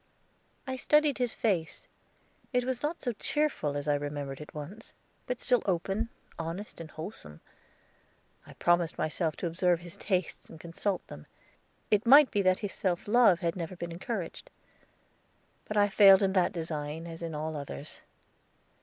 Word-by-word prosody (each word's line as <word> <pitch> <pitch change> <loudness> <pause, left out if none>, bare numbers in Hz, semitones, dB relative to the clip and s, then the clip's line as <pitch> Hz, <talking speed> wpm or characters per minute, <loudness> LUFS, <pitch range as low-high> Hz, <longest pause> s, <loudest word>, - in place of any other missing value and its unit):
I 260 0 -3
studied 300 0 +3
his 245 -2 0
face; 180 -8 -1 0.7
it 250 0 +2
was 255 -1 -2
not 310 +3 -3
so 245 - 0
cheerful 235 - -1
as 145 +1 -5
I 145 - +3
remembered 145 -1 -4
it 150 - -10
once, 155 +9 -9 0.3
but 250 -1 -2
still 245 -2 +2
open, 195 +5 0 0.3
honest, 170 +3 -5
and 160 - -8
wholesome. 155 - -8 1.1
I - - -11
promised 175 -1 +1
myself 155 0 -1
to - - -5
observe 175 0 +1
his 175 +3 -7
tastes 185 -4 -2
and 160 - -12
consult 175 +3 -3
them. 75 - -11 0.6
It 210 +2 +3
might 280 +2 +8
be 205 - +2
that 185 -1 +3
his 200 - -4
self 180 -1 -1
love 210 -5 +5
had 170 -2 0
never 175 0 -5
been 170 -1 -6
encouraged. 185 0 -5 1.2
But 215 - -3
I 205 0 +5
failed 195 -1 +7
in 190 -1 +2
that 185 -2 +3
design, 160 -2 -4
as 165 0 -8
in 165 -2 -4
all 155 +1 -3
others. 140 - -7
180 Hz, 165 wpm, -30 LUFS, 160-215 Hz, 1.2 s, might